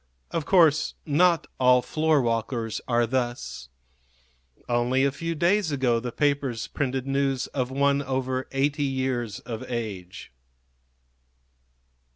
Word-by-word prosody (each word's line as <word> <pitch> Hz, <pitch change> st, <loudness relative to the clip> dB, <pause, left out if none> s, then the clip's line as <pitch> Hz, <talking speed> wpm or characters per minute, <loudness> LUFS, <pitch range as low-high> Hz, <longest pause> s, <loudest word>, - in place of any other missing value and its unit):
Of 165 Hz, -3 st, -2 dB
course 160 Hz, -5 st, +4 dB
not 165 Hz, +2 st, +3 dB
all 125 Hz, -1 st, +5 dB
floorwalkers 120 Hz, -6 st, 0 dB
are 120 Hz, -1 st, +2 dB
thus. 120 Hz, -, -3 dB, 1.0 s
Only 125 Hz, +2 st, +1 dB
a 140 Hz, -, +2 dB
few 165 Hz, +4 st, -4 dB
days 175 Hz, +2 st, +2 dB
ago 130 Hz, -4 st, +1 dB
the 120 Hz, +1 st, -5 dB
papers 140 Hz, -4 st, 0 dB
printed 135 Hz, -2 st, -2 dB
news 135 Hz, -1 st, 0 dB
of 130 Hz, -2 st, -3 dB
one 140 Hz, +1 st, +2 dB
over 130 Hz, -1 st, -2 dB
eighty 140 Hz, +2 st, 0 dB
years 130 Hz, -5 st, -2 dB
of 115 Hz, -2 st, -6 dB
age. 105 Hz, -7 st, -5 dB
130 Hz, 115 wpm, -26 LUFS, 120-145 Hz, 1.0 s, all